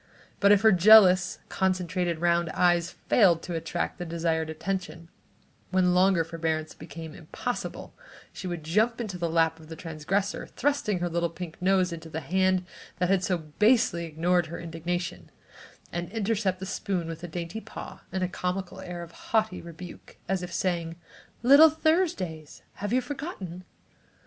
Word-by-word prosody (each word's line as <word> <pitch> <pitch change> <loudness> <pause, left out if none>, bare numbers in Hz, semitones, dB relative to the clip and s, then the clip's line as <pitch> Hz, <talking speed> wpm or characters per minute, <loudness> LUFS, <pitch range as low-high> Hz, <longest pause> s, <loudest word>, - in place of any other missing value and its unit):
But 200 0 +5
if 205 -1 +6
her 220 0 +6
jealous, 185 -1 +7
concentrated 180 -2 0
round 170 0 +2
eyes 175 -1 +3 0.2
failed 180 -8 +4
to 180 - -5
attract 165 +3 -3
the - - -3
desired 165 -1 -1
attention, 170 0 -4 0.6
when 185 -1 +3
longer 185 -1 +4
forbearance 160 -1 -3
became 155 0 -9
impossible, 205 +11 -5 0.4
she 190 - -6
would 175 -3 -4
jump 215 +9 +2
to 215 -6 -4
the 170 -1 -1
lap 160 0 +2
of 155 0 -15
the 160 - -6
transgressor, 170 +5 -2
thrusting 240 -9 -1
her 175 - +1
little 170 0 0
pink 170 0 -8
nose 185 -1 +2
into 165 -1 -8
the 160 +1 -4
hand 185 +1 +1 0.3
that 180 0 0
had 190 -1 +2
so 180 -1 +1
basely 170 +2 +2
ignored 170 +2 +1
her 165 - -6
indignation, 170 +1 -4 0.6
and 175 +1 -4
intercept 205 -3 0
the 190 - -5
spoon 190 -3 -2
with 165 +1 -7
a - - -4
dainty 170 +5 -5
paw - - -9
and 190 0 -1
a - - +1
comical 180 +1 -4
air 175 -2 -6
of 170 - -11
haughty 220 -2 -1
rebuke, 170 +1 -11
as 190 -1 0
if 180 0 -6
saying: 170 -2 -1 0.5
"Little 285 +6 +9
Thursday's! 310 - -1 0.2
Have 205 0 -2
you 255 +2 +3
forgotten?" 245 - -6
180 Hz, 160 wpm, -27 LUFS, 165-195 Hz, 0.6 s, Little